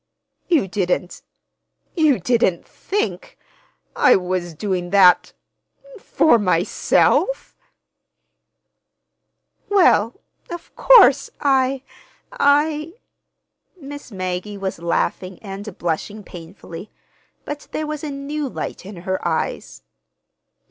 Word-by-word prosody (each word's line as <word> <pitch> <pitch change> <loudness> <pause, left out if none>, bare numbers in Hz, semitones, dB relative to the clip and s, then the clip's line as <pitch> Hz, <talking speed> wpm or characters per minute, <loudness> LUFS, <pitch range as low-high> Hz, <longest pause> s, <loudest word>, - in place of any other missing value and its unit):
"You 320 - +2
didn't—you 205 - -3
didn't 185 -3 +1
think—I 430 +5 -2
was 180 -2 -2
doing 180 0 -3
that—for 235 - +1
myself?" 185 - +1 2.1
"Well, 335 - +3 0.3
of 345 -1 -9
course, 405 - +6
I—I—" 285 - 0 0.9
Miss 285 -3 -10
Maggie 185 +1 -4
was 195 -3 -4
laughing 180 +2 -2
and 200 0 -8
blushing 175 +5 -3
painfully, 175 +1 -11 0.6
but 290 0 -7
there 310 - -3
was 305 -1 -5
a 305 - -3
new 280 +1 -4
light 185 - -6
in 200 - -9
her 190 0 -1
eyes. - - -3
220 Hz, 80 wpm, -20 LUFS, 185-300 Hz, 2.1 s, course